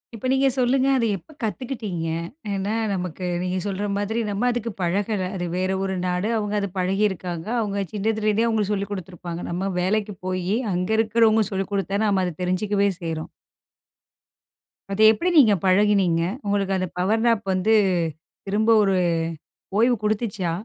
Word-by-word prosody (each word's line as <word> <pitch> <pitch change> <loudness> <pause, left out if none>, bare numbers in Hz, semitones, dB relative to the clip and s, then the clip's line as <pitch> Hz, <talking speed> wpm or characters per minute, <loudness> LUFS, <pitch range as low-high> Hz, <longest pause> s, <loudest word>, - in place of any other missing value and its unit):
இப்ப 225 - -8
நீங்க 270 +1 +3
சொல்லுங்க. 260 +1 +2
அத 245 -3 +2
எப்போ 195 - -18
கத்துக்கிட்டீங்க? 215 -7 -3 0.5
ஏன்னா 195 +2 -2 0.2
நமக்கு 180 -1 -4 0.2
நீங்க 185 +1 -1
சொல்ற 200 +1 -2
மாதிரி 210 +3 -1
நம்ம 205 +5 0
அதுக்கு 235 -1 -3
பழகல. 190 +2 0
அது 175 -1 -3
வேற 185 +1 0
ஒரு 190 0 -2
நாடு. 180 +4 -1
அவுங்க 210 -1 -2
அது 200 - -2
பழகிருக்காங்க. 185 -2 -1
அவுங்க 200 -2 -1
சின்னதுல 215 +1 -1
இருந்தே 215 +2 +2
அவுங்க 220 -2 +1
சொல்லிக் 200 0 -2
குடுத்துருப்பாங்க. 175 -3 -6
நம்ம 185 +3 -2
வேலைக்கு 205 +2 0
போயி 185 +2 -1 0.2
அங்க 180 +2 -1
இருக்கிறவங்க 225 -1 +3
சொல்லிக் 195 +1 -3
குடுத்துதான், 200 +2 0
நம்ம 190 -2 +2
அத 180 - -3
தெரிஞ்சுக்கவே 200 +2 +1
செய்றோம். 160 -2 -4 1.6
அதை 205 +2 +2
எப்பிடி 335 +12 0
நீங்க 225 -7 +6
பழகினீங்க? 190 -3 +3 0.2
உங்களுக்கு 200 -1 0
அந்த 185 0 -1
பவர் 215 +5 +1
நாப் 230 -3 +3
வந்து 185 +4 +2 0.7
திரும்ப 210 +3 +1
ஒரு 195 -1 +2 0.8
ஓய்வு 240 +3 +4
குடுத்துச்சா? 210 -4 -1
200 Hz, 150 wpm, -23 LUFS, 185-220 Hz, 1.6 s, நீங்க